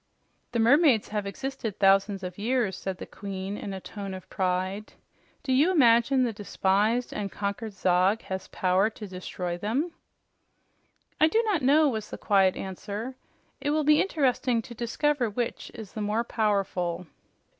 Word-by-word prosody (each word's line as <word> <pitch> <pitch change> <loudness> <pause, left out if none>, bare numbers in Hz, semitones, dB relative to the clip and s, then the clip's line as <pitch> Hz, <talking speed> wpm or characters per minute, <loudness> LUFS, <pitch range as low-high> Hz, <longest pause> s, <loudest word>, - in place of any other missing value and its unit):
"The 240 - -1
mermaids 245 0 +4
have 210 -1 -2
existed 255 -1 -5
thousands 195 0 +3
of 180 +1 -6
years," 230 -3 0
said 190 -1 -5
the - - -7
Queen 195 0 -6
in 205 - -6
a 190 - -5
tone 195 0 -7
of 185 - -10
pride. 185 +2 -2 0.5
"Do 265 -3 0
you 290 +7 +4
imagine 255 -5 +4
the 235 -2 0
despised 205 +3 0
and 200 -2 -4
conquered 205 +2 -4
Zog 185 +3 +2
has 190 0 -5
power 185 +3 +2
to 215 -1 -9
destroy 180 -1 -5
them?" 260 - -1 1.3
"I 315 - +6
do 445 +8 +2
not 415 -7 +1
know," 295 +4 +5
was 220 -6 -3
the - - -6
quiet 195 -2 +3
answer. 205 +6 -5 0.5
"It 285 0 -2
will 305 +1 +1
be 300 +1 +5
interesting 255 -8 +1
to 240 - -10
discover 245 +2 0
which 235 +3 -3
is 220 -4 -9
the 215 - -4
more 210 +3 0
powerful." 195 -6 -1
215 Hz, 160 wpm, -27 LUFS, 195-255 Hz, 1.3 s, I